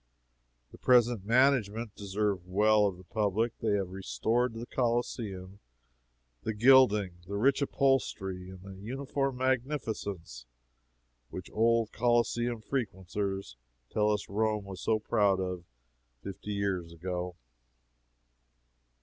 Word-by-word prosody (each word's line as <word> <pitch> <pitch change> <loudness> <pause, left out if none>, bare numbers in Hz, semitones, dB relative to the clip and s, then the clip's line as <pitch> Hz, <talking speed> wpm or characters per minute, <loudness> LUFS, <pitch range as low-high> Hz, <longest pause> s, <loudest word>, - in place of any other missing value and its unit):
The - - -14
present 120 -5 +4
management 115 -3 +2
deserve 100 -2 -2
well 105 +2 +4
of 95 -3 -4
the 90 - -14
public. 110 +4 0
They 110 -3 0
have 95 -3 -1
restored 110 - 0
to 115 - -7
the - - -5
Coliseum 115 -6 -2 0.8
the 110 - -3
gilding, 105 -6 +5
the 100 - -4
rich 130 +7 +3
upholstery 110 -10 0
and 95 -1 -11
the 100 0 -9
uniform 135 +3 -2
magnificence 115 - -2 0.8
which - - -8
old 115 0 +2
Coliseum 120 0 +1
frequenters 95 - -3 0.3
tell 105 0 +2
us 105 -1 -1
Rome 105 0 0
was 95 -1 -8
so 110 - +2
proud 100 -2 +2
of 90 -2 -4 0.6
fifty 100 +1 -7
years 95 -4 -2
ago. 90 +1 -4
105 Hz, 115 wpm, -30 LUFS, 95-120 Hz, 0.8 s, gilding